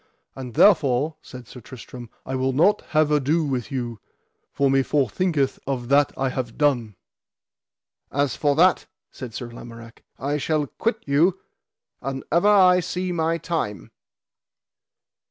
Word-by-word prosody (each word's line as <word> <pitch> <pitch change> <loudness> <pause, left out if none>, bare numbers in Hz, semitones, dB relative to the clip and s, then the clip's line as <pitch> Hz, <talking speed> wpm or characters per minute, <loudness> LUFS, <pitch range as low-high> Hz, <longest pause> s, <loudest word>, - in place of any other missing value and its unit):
And 125 -3 -8
therefore, 150 -5 +3
said 125 -2 -12
Sir 125 - -12
Tristram, 120 0 -11 0.2
I 130 - -5
will 130 0 0
not 185 +10 +3
have 155 -1 +2
ado 150 +3 +2
with 130 -6 -3
you, 120 -4 -4 0.5
for 140 - +1
me 135 0 +3
forthinketh 140 - 0
of 125 -3 -3
that 140 0 +4
I 135 0 0
have 125 -3 -5
done. 125 -8 +1 1.2
As 140 -3 0
for 145 -2 +1
that, 180 +4 +3 0.2
said 125 -5 -9
Sir 120 - -6
Lamorak, 115 0 -12 0.2
I 145 +2 -2
shall 155 0 0
quit 225 - -3
you, 165 +7 +2 0.6
an 135 +1 -4
ever 170 +6 +3
I 185 -3 +6
see 180 +1 -3
my 165 -1 0
time. 150 - -4
140 Hz, 140 wpm, -23 LUFS, 125-165 Hz, 1.2 s, I